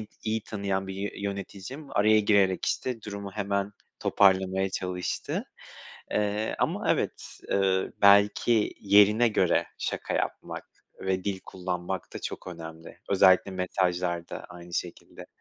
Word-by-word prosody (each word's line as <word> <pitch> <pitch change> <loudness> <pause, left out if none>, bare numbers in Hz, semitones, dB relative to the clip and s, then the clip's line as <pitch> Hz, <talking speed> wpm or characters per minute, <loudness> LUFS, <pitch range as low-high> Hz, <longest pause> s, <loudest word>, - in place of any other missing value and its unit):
i 110 - -8 0.2
iyi 110 0 -1
tanıyan 100 -2 -2
bir 95 - -5
yö 100 +1 -3
yöneticim 100 +8 -6
araya 110 +1 +5
girerek 100 -3 +3
işte 120 -4 -2
durumu 100 -1 -6
hemen 100 -1 -1 0.3
toparlamaya 95 -1 +3
çalıştı. 90 -2 -3 0.7
Eee, 105 +1 0
ama - - 0
evet, - - -4
eee, 95 -1 +1
belki 105 +2 +5
yerine 105 +4 +5
göre 105 - +2
şaka - - -3
yapmak - - -3 0.4
ve 95 -1 -1
dil 95 -2 -2
kullanmak 90 0 -4
da - - -3
çok - - -6
önemli. 80 -2 -9
Özellikle 95 0 +5
mesajlarda 90 -2 -1
aynı 85 -1 -10
şekilde. 85 - -6
100 Hz, 125 wpm, -28 LUFS, 95-105 Hz, 0.7 s, araya